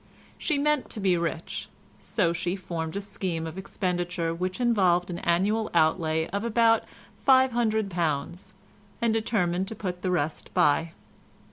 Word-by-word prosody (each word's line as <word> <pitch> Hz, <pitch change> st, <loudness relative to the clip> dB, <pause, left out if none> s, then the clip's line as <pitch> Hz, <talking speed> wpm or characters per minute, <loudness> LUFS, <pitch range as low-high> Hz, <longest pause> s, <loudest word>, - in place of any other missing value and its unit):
She 305 Hz, -, 0 dB
meant 300 Hz, -1 st, +1 dB
to 220 Hz, -, -6 dB
be 190 Hz, -3 st, +3 dB
rich, 170 Hz, +3 st, -3 dB, 0.3 s
so 185 Hz, -3 st, 0 dB
she 175 Hz, +2 st, -1 dB
formed 170 Hz, -3 st, -4 dB
a 200 Hz, -, -2 dB
scheme 190 Hz, -5 st, -3 dB
of 160 Hz, 0 st, -6 dB
expenditure 175 Hz, -3 st, -2 dB
which 185 Hz, +4 st, -3 dB
involved 185 Hz, -8 st, +3 dB
an 175 Hz, -, -4 dB
annual 205 Hz, +6 st, +1 dB
outlay 160 Hz, 0 st, +2 dB
of 200 Hz, +1 st, -2 dB
about 230 Hz, 0 st, +3 dB, 0.4 s
£500, 215 Hz, -, +2 dB, 0.5 s
and 235 Hz, -2 st, +2 dB
determined 190 Hz, -5 st, 0 dB
to 220 Hz, -, -6 dB
put 180 Hz, -4 st, -4 dB
the 185 Hz, -, -1 dB
rest 160 Hz, -4 st, -2 dB
by. 160 Hz, +3 st, +3 dB
185 Hz, 140 wpm, -27 LUFS, 170-215 Hz, 0.5 s, be